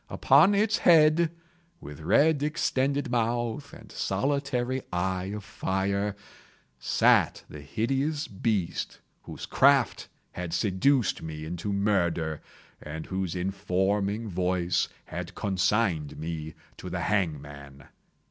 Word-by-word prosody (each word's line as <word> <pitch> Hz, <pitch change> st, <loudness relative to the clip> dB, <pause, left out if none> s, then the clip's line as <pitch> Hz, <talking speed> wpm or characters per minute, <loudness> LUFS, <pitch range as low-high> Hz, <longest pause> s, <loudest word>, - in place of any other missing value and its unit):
Upon 155 Hz, +10 st, +5 dB
its 210 Hz, 0 st, +2 dB
head, 160 Hz, 0 st, +5 dB, 0.5 s
with 75 Hz, +1 st, -10 dB
red 140 Hz, -, +3 dB
extended 140 Hz, -3 st, 0 dB
mouth 120 Hz, +3 st, -1 dB
and 110 Hz, -3 st, -13 dB
solitary 130 Hz, +3 st, -1 dB
eye 90 Hz, +1 st, -1 dB
of 105 Hz, +1 st, -5 dB
fire, 100 Hz, +2 st, -2 dB, 0.6 s
sat 60 Hz, -, +3 dB
the 75 Hz, -, -10 dB
hideous 135 Hz, -, -1 dB
beast 100 Hz, -3 st, -2 dB, 0.2 s
whose -, -, -8 dB
craft 135 Hz, -3 st, +3 dB, 0.2 s
had 90 Hz, -2 st, -5 dB
seduced 100 Hz, +6 st, +1 dB
me 80 Hz, -1 st, -6 dB
into 90 Hz, +5 st, -4 dB
murder, 85 Hz, -6 st, 0 dB, 0.4 s
and 80 Hz, +1 st, -7 dB
whose 95 Hz, -2 st, -3 dB
informing 100 Hz, +3 st, -1 dB
voice 90 Hz, -1 st, 0 dB, 0.2 s
had 90 Hz, +1 st, -7 dB
consigned 95 Hz, -5 st, 0 dB
me 80 Hz, 0 st, -5 dB, 0.2 s
to -, -, -7 dB
the -, -, -3 dB
hangman. 70 Hz, -8 st, -3 dB
100 Hz, 110 wpm, -27 LUFS, 85-130 Hz, 0.6 s, Upon